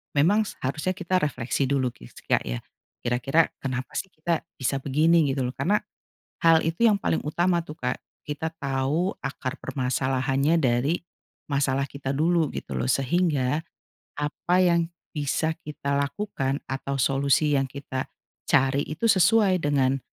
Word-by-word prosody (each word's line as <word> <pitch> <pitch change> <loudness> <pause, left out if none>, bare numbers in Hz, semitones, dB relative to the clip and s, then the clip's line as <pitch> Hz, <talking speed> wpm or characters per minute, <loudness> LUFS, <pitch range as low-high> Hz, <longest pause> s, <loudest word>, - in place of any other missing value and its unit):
memang 200 +10 +4
seharusnya 155 +7 -2
kita 185 0 0
refleksi 140 -2 0
dulu 130 -3 +1
ki - - -14
sih - - -16
Kak - - +2
ya, - - -3 0.4
kira-kira 130 +6 +2
kenapa 130 -1 -3
sih 190 - -3
kita 160 +1 -1
bisa 135 +1 0
begini? 155 +2 +3
Gitu 135 - -2
loh, 125 - -3
karena 205 +4 +2 0.6
hal 165 -1 +7
itu 170 +9 +3
yang 210 - +4
paling 160 - 0
utama 170 +3 +1
tuh 155 -1 -10
Kak, 125 0 -1 0.3
kita 150 +2 -2
tahu 140 +7 0
akar 130 -1 -4
permasalahannya 135 +3 +1
dari 130 +6 +2 0.5
masalah 140 -1 +1
kita 140 -1 -4
dulu 165 +2 +2
gitu - - -6
loh 125 - -1
sehingga 140 0 +1 0.6
apa 150 +4 -1
yang 170 -2 +3 0.2
bisa 150 +2 0
kita 140 -3 -3
lakukan 140 -3 -2
atau 135 +1 -3
solusi 140 +2 +3
yang 135 - +1
kita 130 -1 -5 0.4
cari 135 -2 +3
itu 155 +9 -5
sesuai 195 0 +4
dengan 135 -3 +2
145 Hz, 145 wpm, -26 LUFS, 135-165 Hz, 0.6 s, hal